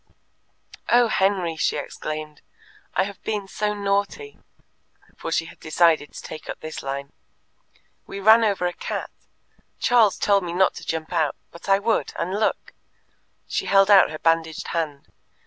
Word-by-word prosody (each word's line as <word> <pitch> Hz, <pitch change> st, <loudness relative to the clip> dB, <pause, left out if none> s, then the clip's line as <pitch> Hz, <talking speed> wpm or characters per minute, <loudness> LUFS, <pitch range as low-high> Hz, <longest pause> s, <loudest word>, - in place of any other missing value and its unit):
"Oh, 240 Hz, -1 st, +5 dB
Henry," 190 Hz, -5 st, +1 dB
she 150 Hz, -1 st, 0 dB
exclaimed, 155 Hz, +1 st, -6 dB, 0.5 s
"I 190 Hz, -, +3 dB
have 200 Hz, 0 st, -7 dB
been 210 Hz, -3 st, -3 dB
so 210 Hz, +1 st, -2 dB
naughty," 200 Hz, -, -2 dB, 0.8 s
for 165 Hz, -, -6 dB
she 165 Hz, -, +1 dB
had -, -, -13 dB
decided 155 Hz, -2 st, +2 dB
to -, -, -9 dB
take 155 Hz, -, -9 dB
up -, -, -5 dB
this 155 Hz, 0 st, -7 dB
line. 140 Hz, +1 st, -5 dB, 0.9 s
"We 200 Hz, -, -6 dB
ran 220 Hz, +3 st, +6 dB
over 200 Hz, -4 st, +1 dB
a 175 Hz, -, -1 dB
cat. -, -, -5 dB, 0.7 s
Charles 230 Hz, -5 st, +4 dB
told 200 Hz, -1 st, +3 dB
me 170 Hz, -1 st, -4 dB
not 190 Hz, +2 st, +3 dB
to -, -, -9 dB
jump 160 Hz, +1 st, -3 dB
out, 160 Hz, -4 st, +1 dB, 0.2 s
but 170 Hz, -, -10 dB
I 195 Hz, -, +6 dB
would, 220 Hz, +3 st, 0 dB
and 185 Hz, -, -3 dB
look!" 215 Hz, -, -1 dB, 0.7 s
She -, -, -3 dB
held 195 Hz, +1 st, +5 dB
out 195 Hz, -, +7 dB
her 155 Hz, -, -6 dB
bandaged 165 Hz, 0 st, 0 dB
hand. 155 Hz, -4 st, -3 dB
180 Hz, 160 wpm, -23 LUFS, 160-200 Hz, 0.9 s, out